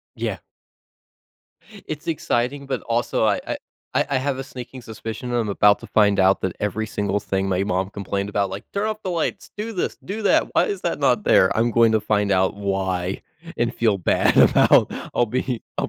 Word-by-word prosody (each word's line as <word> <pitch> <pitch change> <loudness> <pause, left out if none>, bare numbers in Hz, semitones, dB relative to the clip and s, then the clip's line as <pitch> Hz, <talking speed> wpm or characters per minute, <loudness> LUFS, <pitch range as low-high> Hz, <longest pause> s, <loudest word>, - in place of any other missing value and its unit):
Yeah. - - -3 1.5
It's 150 -1 -6
exciting, 140 -3 -1
but 130 -2 -3
also, 120 -1 0
I 105 -2 +2
I - - -2 0.4
I - - +2
I 140 - +1
have 135 +1 -1
a 135 - -4
sneaking 130 -1 -9
suspicion, 115 +2 -6
I'm 120 -3 0
about 105 +1 +4
to 115 - -10
find 100 -3 +3
out 95 +1 +3
that 95 - -1
every 105 +2 -2
single 100 -1 -1
thing 95 -1 -2
my 95 0 0
mom 95 -1 -1
complained 100 0 -3
about, 100 -1 -1
like, 95 +2 -6
"Turn 200 +2 0
off 215 0 -4
the 185 - -3
lights, 170 -2 -2
do 220 +2 -4
this, 185 - -2
do 215 +3 -5
that. 205 - +3
Why - - +4
is 410 -4 -4
that - - -1
not - - +2
there?" - - +5
I'm 115 +1 +2
going 115 -1 +4
to 110 - +3
find 105 -1 0
out 95 -1 +2
why 95 -2 -2 0.3
and 120 +1 0
feel 110 -3 +2
bad 90 - +2
about, - - +5 0.2
I'll 120 - +3
be 125 +1 -2 0.2
I'll - - 0
110 Hz, 200 wpm, -22 LUFS, 100-130 Hz, 1.5 s, there